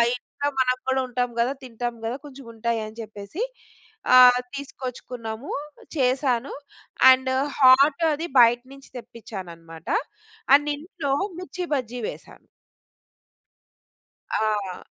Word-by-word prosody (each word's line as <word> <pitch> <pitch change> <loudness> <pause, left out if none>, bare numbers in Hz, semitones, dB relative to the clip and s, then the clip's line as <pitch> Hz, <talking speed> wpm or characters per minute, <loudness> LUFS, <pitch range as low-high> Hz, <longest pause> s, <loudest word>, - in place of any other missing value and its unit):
ఇంట్లో 285 +3 -5
మనం 255 -1 +3
గూడా 265 0 +2
ఉంటాం 245 0 -1
గదా! 240 +3 +2
తింటాం 240 -1 -4
గదా! 230 +2 -2
కొంచెముంటాయని 230 -4 -5
జెప్పేసి 210 - -8 0.7
ఆహ్, 250 -1 +8 0.2
తీసుకొచ్చుకున్నాము. 250 -3 -7 0.5
చేశాను. 260 -1 +1 0.6
అండ్ 260 0 +2 0.3
హాట్ 275 +4 +6
అది 320 +3 -3
బయట 240 0 +6
నించి 275 0 -15
తెప్పిచ్చాననమాట. 170 -9 -10 0.7
అండ్ 290 +1 +2
ఇంట్లో 295 -2 -5 0.3
'మిర్చి 360 +1 -5
బజ్జీ' 250 -2 -4
వేశా. - - -9 2.0
ఆ! 210 -4 -1
250 Hz, 95 wpm, -24 LUFS, 225-275 Hz, 2.0 s, ఆహ్